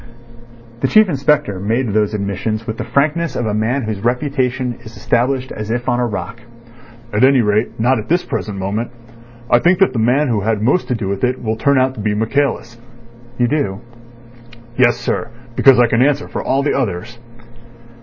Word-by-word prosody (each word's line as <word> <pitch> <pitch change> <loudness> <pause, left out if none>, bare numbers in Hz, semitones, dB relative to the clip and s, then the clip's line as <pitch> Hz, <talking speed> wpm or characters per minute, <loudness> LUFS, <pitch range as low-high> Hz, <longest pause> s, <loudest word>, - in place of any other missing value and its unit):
The 135 - +1
Chief 215 +7 +5
Inspector 140 - +1
made 115 +5 -1
those 105 0 +1
admissions 105 +2 -3
with 110 0 -5
the - - -2
frankness 150 +7 0
of 120 - -1
a 105 - -1
man 115 +6 0
whose 110 -2 -3
reputation 125 -1 -1
is 110 0 -12
established 130 +2 0
as 110 0 -6
if 120 +1 -2
on 120 -1 +1
a 120 - +1
rock. 115 +1 -6 0.7
"At 105 - +2
any 135 -1 +5
rate 105 +1 0
not 120 +2 +2
at 110 - -8
this 175 +2 +1
present 105 -2 -4
moment. 100 +5 -3 0.6
I 120 - +4
think 175 +7 +3
that 195 0 +3
the 120 - -1
man 130 +7 +2
who 110 -4 0
had 110 +1 0
most 140 +10 +2
to 125 - 0
do 110 -4 -4
with 100 0 -3
it 125 0 0
will 110 -1 -1
turn 140 +5 +2
out 130 0 +2
to 115 - -11
be 105 0 -1
Michaelis." 115 +1 -1 0.6
"You 120 - +2
do?" 115 -8 -1 0.9
"Yes, 120 -2 +3
sir; 120 -1 -3 0.3
because 135 0 +6
I 120 - +6
can 115 +1 +1
answer 145 +2 +2
for - - -4
all 135 +1 0
the 145 - +1
others." 115 -2 -3
120 Hz, 195 wpm, -17 LUFS, 110-135 Hz, 0.9 s, because